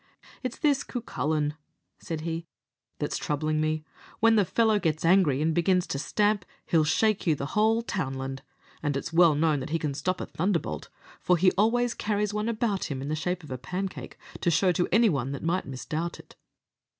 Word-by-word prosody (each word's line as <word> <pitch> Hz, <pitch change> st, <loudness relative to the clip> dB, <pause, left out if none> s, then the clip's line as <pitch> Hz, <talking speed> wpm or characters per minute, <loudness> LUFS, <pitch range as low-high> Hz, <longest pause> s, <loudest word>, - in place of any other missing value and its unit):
"It's 255 Hz, -2 st, -4 dB
this 285 Hz, -3 st, +2 dB
Cucullin," 155 Hz, -, -2 dB, 0.5 s
said 165 Hz, -3 st, -5 dB
he, 165 Hz, +1 st, -4 dB, 0.5 s
"that's 145 Hz, -, -2 dB
troubling 155 Hz, +1 st, -1 dB
me. 155 Hz, 0 st, 0 dB, 0.4 s
When 225 Hz, 0 st, +5 dB
the 205 Hz, -3 st, +4 dB
fellow 220 Hz, +1 st, +2 dB
gets 160 Hz, -4 st, -1 dB
angry, 165 Hz, -6 st, +4 dB
and 160 Hz, 0 st, +2 dB
begins 180 Hz, +2 st, +2 dB
to 140 Hz, -, -3 dB
stamp, 205 Hz, +4 st, +1 dB, 0.2 s
he'll 160 Hz, -2 st, +3 dB
shake 205 Hz, +6 st, +1 dB
you 160 Hz, -, +4 dB
a 140 Hz, -, -2 dB
whole 220 Hz, +8 st, +2 dB
townland; 135 Hz, -, -3 dB, 0.4 s
and 145 Hz, -2 st, 0 dB
it's 165 Hz, +4 st, -5 dB
well 165 Hz, -2 st, +6 dB
known 155 Hz, -1 st, +2 dB
that 130 Hz, -, -5 dB
he 165 Hz, -, +1 dB
can 150 Hz, -3 st, -2 dB
stop 180 Hz, +6 st, -2 dB
a -, -, -3 dB
thunderbolt, 165 Hz, -, -2 dB, 0.3 s
for 180 Hz, -, +3 dB
he 185 Hz, +2 st, +5 dB
always 235 Hz, +4 st, +2 dB
carries 210 Hz, -1 st, -1 dB
one 210 Hz, +2 st, -1 dB
about 220 Hz, -4 st, 0 dB
him 135 Hz, -3 st, -4 dB
in 140 Hz, -, -4 dB
the 155 Hz, -, 0 dB
shape 180 Hz, +3 st, -2 dB
of 150 Hz, -, -11 dB
a 130 Hz, -, -4 dB
pancake, 185 Hz, +6 st, -5 dB, 0.2 s
to -, -, +1 dB
show 180 Hz, +3 st, +3 dB
to 175 Hz, +1 st, 0 dB
anyone 160 Hz, -, +3 dB
that 140 Hz, -, -6 dB
might 175 Hz, +3 st, 0 dB
misdoubt 155 Hz, +6 st, -4 dB
it." -, -, -15 dB
170 Hz, 190 wpm, -27 LUFS, 150-205 Hz, 0.5 s, well